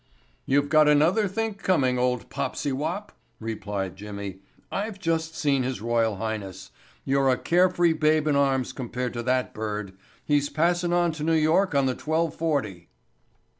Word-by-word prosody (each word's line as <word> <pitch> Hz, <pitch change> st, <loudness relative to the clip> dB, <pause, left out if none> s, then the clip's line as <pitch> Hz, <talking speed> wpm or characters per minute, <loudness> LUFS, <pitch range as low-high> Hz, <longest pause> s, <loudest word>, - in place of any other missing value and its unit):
"You've 140 Hz, +1 st, +2 dB
got 155 Hz, 0 st, +5 dB
another 160 Hz, +9 st, +4 dB
think 220 Hz, +1 st, -3 dB
coming, 130 Hz, -9 st, +2 dB
old 125 Hz, -1 st, 0 dB
popsy 145 Hz, -, -2 dB
wop," 160 Hz, +10 st, -3 dB, 0.3 s
replied 105 Hz, -4 st, -4 dB
Jimmy. 100 Hz, -1 st, -7 dB, 0.3 s
"I've 205 Hz, +1 st, -3 dB
just 165 Hz, -3 st, -1 dB
seen 140 Hz, -3 st, +2 dB
his 130 Hz, 0 st, -2 dB
royal 115 Hz, -1 st, +1 dB
highness. 100 Hz, -3 st, -5 dB, 0.3 s
You're 135 Hz, 0 st, +2 dB
a 130 Hz, -, +3 dB
care 180 Hz, +2 st, +3 dB
free 175 Hz, -2 st, +2 dB
babe 155 Hz, -1 st, +2 dB
in 150 Hz, -2 st, +2 dB
arms 135 Hz, -2 st, +1 dB
compared 125 Hz, -1 st, -4 dB
to 120 Hz, -, -3 dB
that 125 Hz, +1 st, 0 dB
bird. 105 Hz, -3 st, -4 dB, 0.3 s
He's 145 Hz, -1 st, +2 dB
passin' 175 Hz, +3 st, +1 dB
on 175 Hz, -1 st, +2 dB
to 155 Hz, -1 st, -6 dB
New 165 Hz, +1 st, +2 dB
York 160 Hz, +3 st, +2 dB
on 140 Hz, -1 st, +3 dB
the 130 Hz, -, +1 dB
twelve 160 Hz, +3 st, -1 dB
forty." 120 Hz, -, -2 dB
140 Hz, 165 wpm, -25 LUFS, 120-165 Hz, 0.3 s, got